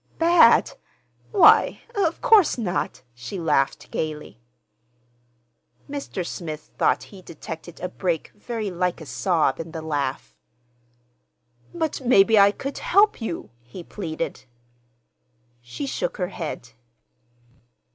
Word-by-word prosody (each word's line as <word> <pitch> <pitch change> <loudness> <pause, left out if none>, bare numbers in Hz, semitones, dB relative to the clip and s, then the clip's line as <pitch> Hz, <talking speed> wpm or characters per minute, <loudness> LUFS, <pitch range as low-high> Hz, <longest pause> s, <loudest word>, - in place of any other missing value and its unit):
"Bad? 335 0 +5 0.6
Why, 405 - +5
of 360 -7 0
course 440 - +5
not!" 190 - -3
She 120 +11 -7
laughed 145 -5 0
gayly. 150 -7 -5 1.5
Mr. 280 -10 -5
Smith 155 -4 -7
thought - - +1
he 190 - -11
detected 170 0 -9
a 180 - -2
break 175 -3 -2
very 215 -1 -5
like 180 0 -1
a 160 - -9
sob 160 -3 0
in 165 0 -7
the 160 - -5
laugh. 145 -4 -3 1.4
"But 320 -4 -3
maybe 225 -3 +5
I 200 0 +7
could—help 405 - +1
you," 170 - -5
he 120 +10 -11
pleaded. 165 -8 -5 1.2
She 120 - -6
shook 275 - -3
her 180 -3 -2
head. 155 -9 -6
180 Hz, 110 wpm, -23 LUFS, 160-255 Hz, 1.5 s, I